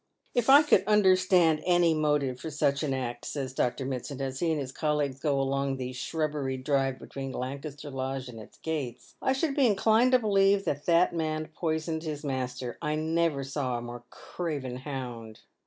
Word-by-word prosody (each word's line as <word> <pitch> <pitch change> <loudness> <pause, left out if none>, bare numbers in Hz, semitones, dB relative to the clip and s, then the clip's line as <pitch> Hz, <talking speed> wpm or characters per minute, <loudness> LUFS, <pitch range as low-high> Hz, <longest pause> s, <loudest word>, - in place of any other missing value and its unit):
" - - -42
If 245 +1 +1
I 285 +3 +9
could 300 - +4
understand 185 -5 +4
any 175 -2 +4
motive 150 -4 0
for 160 - -5
such 140 -1 +1
an 150 -3 -1
act," 120 -2 -3
says 135 -3 -4
Dr. 130 +1 -1
Mitsand, 130 +1 -4
as 135 -1 -3
he 170 - +1
and 155 - 0
his 130 -2 -4
colleagues 145 -3 -1
go 140 -2 +1
along 135 0 0
the 130 -1 -4
shrabberied 140 -2 -2
drive 135 -2 +1
between 135 0 -7
Lancaster 140 +3 -6
Lodge 135 0 -3
and 115 -2 -9
its 110 - -13
gates, 145 -7 -5
"I 265 - +2
should 275 +1 -1
be 275 -4 +4
inclined 225 +4 +3
to - - +8
believe 200 -3 +3
that 145 0 -2
that 170 +1 +4
man 155 -2 -2
poisoned 160 0 -2
his 155 -2 -5
master. 130 -3 -3
I 150 -2 -1
never 160 -2 0
saw 135 -2 -2
a - - -5
more 120 0 -7
craven 140 -8 -5
hound. 125 -5 -7
145 Hz, 190 wpm, -28 LUFS, 130-165 Hz, -, I